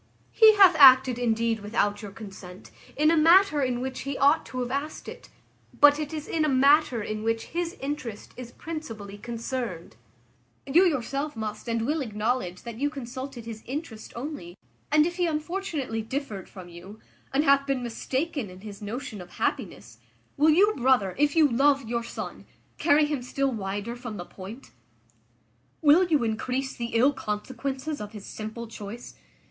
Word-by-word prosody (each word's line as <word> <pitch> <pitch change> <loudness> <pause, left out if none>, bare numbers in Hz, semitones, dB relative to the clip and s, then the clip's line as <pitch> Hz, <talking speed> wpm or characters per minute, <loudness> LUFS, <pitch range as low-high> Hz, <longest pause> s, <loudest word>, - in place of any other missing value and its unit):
He 435 -1 +7
hath 385 -4 +7
acted 260 -3 +8
indeed 230 -1 0
without 205 0 -1
your 205 - -7
consent, 195 -2 -11 0.3
in 305 +2 +4
a - - +4
matter 330 0 +5
in 250 -2 -1
which 260 0 -4
he 275 0 -4
ought 285 +4 +3
to 255 - -4
have 245 0 -3
asked 285 +3 -4
it, - - -10 0.5
but 290 0 +7
it 300 -1 -4
is 310 -1 -5
in 320 - 0
a 305 - +2
matter 270 -3 +4
in 215 +1 -4
which 225 0 -1
his 345 +2 -2
interest 265 -6 -5
is 245 -1 -9
principally 225 -13 -7
concerned; 230 - -5 0.7
you 330 +7 +5
yourself 285 -2 -1
must 215 0 -5
and 230 -1 0
will 305 +4 0
acknowledge 215 -5 -2
that 235 -1 -8
you 290 +1 +1
consulted 260 -2 -7
his 225 -1 -7
interest 260 -5 -6
only, 235 - -6 0.4
and 305 0 +5
if 345 +1 -3
he 355 -1 +1
unfortunately 310 - -3
differed 225 -4 -5
from 185 -3 -11
you, 175 +5 -12 0.3
and 280 +2 +2
hath 275 -1 +4
been 270 -2 -1
mistaken 260 - -3
in 185 +1 -13
his 205 -1 -10
notion 220 0 -6
of 175 - -13
happiness, - - -3 0.4
will 305 +2 +4
you, 395 +7 +5
brother, 245 -7 +2
if 290 +1 +2
you 315 -2 +6
love 275 0 +2
your 235 +1 -1
son, - - -7 0.3
carry 295 +1 +4
him 295 -3 -2
still 270 +2 -1
wider 205 +1 -4
from 240 -3 -7
the 175 - -6
point? 200 +9 -11 1.1
Will 320 +5 +6
you 305 -7 +2
increase 250 +4 -2
the 235 -1 -5
ill 260 +5 +4
consequences 260 +7 -4
of 210 0 -7
his 210 -2 -9
simple 220 +2 -7
choice? 220 +1 -9
255 Hz, 170 wpm, -26 LUFS, 220-290 Hz, 1.1 s, acted